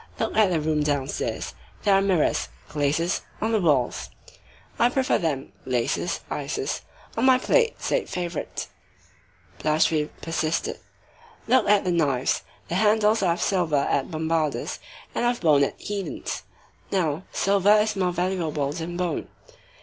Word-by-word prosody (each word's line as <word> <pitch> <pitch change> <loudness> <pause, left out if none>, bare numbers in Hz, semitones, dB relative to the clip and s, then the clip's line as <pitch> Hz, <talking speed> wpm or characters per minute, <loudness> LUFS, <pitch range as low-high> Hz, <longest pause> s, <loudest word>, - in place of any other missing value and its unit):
Look - - -1
at 215 -3 +5
the 170 -3 +1
room 155 0 0
downstairs; 145 -2 -2 0.3
there 200 - +4
are 195 - +5
mirrors 190 -5 +1 0.2
[glaces] 155 +5 0 0.2
on 220 +1 0
the 220 -2 +2
walls." 140 -8 +1 0.7
"I 240 - +5
prefer 260 +1 +1
them 145 -5 -2
[glaces, 125 -2 -1
ices] - - -3 0.3
on 230 - +1
my 260 -1 +7
plate," 465 - +2
said - - -1
Favourite. 175 -3 -4 0.9
Blachevelle 155 0 +2
persisted:— 165 0 -1 0.7
"Look 250 -5 +4
at 205 -1 +5
the 180 - 0
knives. 140 -7 +1 0.3
The 170 - -3
handles 215 0 +4
are 180 -3 +3
of 170 - -5
silver 175 -6 +1
at 135 - 0
Bombarda's 160 -2 -1 0.3
and - - -1
of 240 0 +1
bone 150 -5 +5
at - - -1
Édon's. 200 -2 -4 0.5
Now, 165 -4 0
silver 200 +1 +3
is 215 0 +2
more 185 -2 +1
valuable 170 -5 -1
than 170 +1 -5
bone." 180 -3 -2
175 Hz, 140 wpm, -25 LUFS, 155-205 Hz, 0.9 s, my